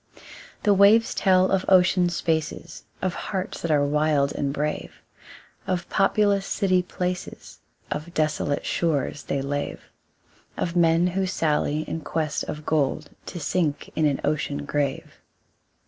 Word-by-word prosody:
The 205 Hz, -, +5 dB
waves 205 Hz, +4 st, +5 dB
tell 185 Hz, -1 st, +3 dB
of 195 Hz, -1 st, +2 dB
ocean 180 Hz, -1 st, +4 dB
spaces, 165 Hz, -1 st, -3 dB, 0.2 s
Of 185 Hz, -2 st, 0 dB
hearts 190 Hz, -1 st, -4 dB
that 170 Hz, -, -3 dB
are 145 Hz, -2 st, +3 dB
wild 150 Hz, -1 st, +1 dB
and 140 Hz, -1 st, -1 dB
brave, 150 Hz, +2 st, -4 dB, 0.6 s
Of 175 Hz, -2 st, -1 dB
populous 200 Hz, 0 st, +2 dB
city 185 Hz, -3 st, +2 dB
places, 180 Hz, 0 st, -5 dB, 0.3 s
Of 155 Hz, +3 st, -4 dB
desolate 150 Hz, -2 st, 0 dB
shores 145 Hz, -4 st, -1 dB
they 140 Hz, -1 st, -2 dB
lave, 145 Hz, +1 st, -3 dB, 0.8 s
Of 170 Hz, 0 st, -2 dB
men 165 Hz, 0 st, +4 dB
who 185 Hz, +1 st, 0 dB
sally 155 Hz, -3 st, 0 dB
in 165 Hz, -, -4 dB
quest 155 Hz, 0 st, -2 dB
of 150 Hz, 0 st, -6 dB
gold 150 Hz, 0 st, 0 dB, 0.2 s
To 175 Hz, -, -6 dB
sink 155 Hz, -1 st, -1 dB
in 155 Hz, -1 st, +3 dB
an 140 Hz, -2 st, 0 dB
ocean 145 Hz, -1 st, -1 dB
grave. 145 Hz, -2 st, -3 dB
165 Hz, 135 wpm, -24 LUFS, 150-185 Hz, 0.8 s, The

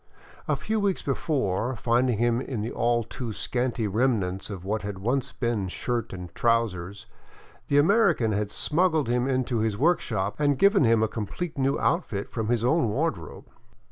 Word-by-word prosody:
A -, -, +2 dB
few 220 Hz, 0 st, -2 dB
weeks 200 Hz, -2 st, 0 dB
before, 130 Hz, -, -1 dB
finding 120 Hz, +1 st, +1 dB
him 120 Hz, +2 st, +1 dB
in 125 Hz, -5 st, -4 dB
the 110 Hz, -, -3 dB
all 120 Hz, 0 st, +1 dB
too 115 Hz, +1 st, -6 dB
scanty 120 Hz, 0 st, -2 dB
remnants 105 Hz, -4 st, 0 dB
of 95 Hz, -3 st, -7 dB
what 105 Hz, +2 st, -1 dB
had 100 Hz, -1 st, -5 dB
once 130 Hz, +7 st, -1 dB
been 115 Hz, -7 st, -1 dB
shirt 120 Hz, +5 st, -3 dB
and 90 Hz, -2 st, -8 dB
trousers, 105 Hz, -5 st, 0 dB, 0.6 s
the 140 Hz, -, +2 dB
American 170 Hz, -, +4 dB
had 105 Hz, 0 st, -1 dB
smuggled 160 Hz, -, +1 dB
him 125 Hz, +2 st, +1 dB
into 130 Hz, -3 st, 0 dB
his 110 Hz, -2 st, 0 dB
workshop 115 Hz, -, 0 dB
and 145 Hz, -2 st, +2 dB
given 200 Hz, -, +5 dB
him 115 Hz, -1 st, +4 dB
a -, -, +2 dB
complete 120 Hz, -, -5 dB
new 135 Hz, +1 st, 0 dB
outfit 115 Hz, -, -1 dB
from 110 Hz, -2 st, -3 dB
his 120 Hz, 0 st, +1 dB
own 135 Hz, -2 st, +2 dB
wardrobe. 105 Hz, -, -3 dB
120 Hz, 170 wpm, -26 LUFS, 105-140 Hz, 0.6 s, given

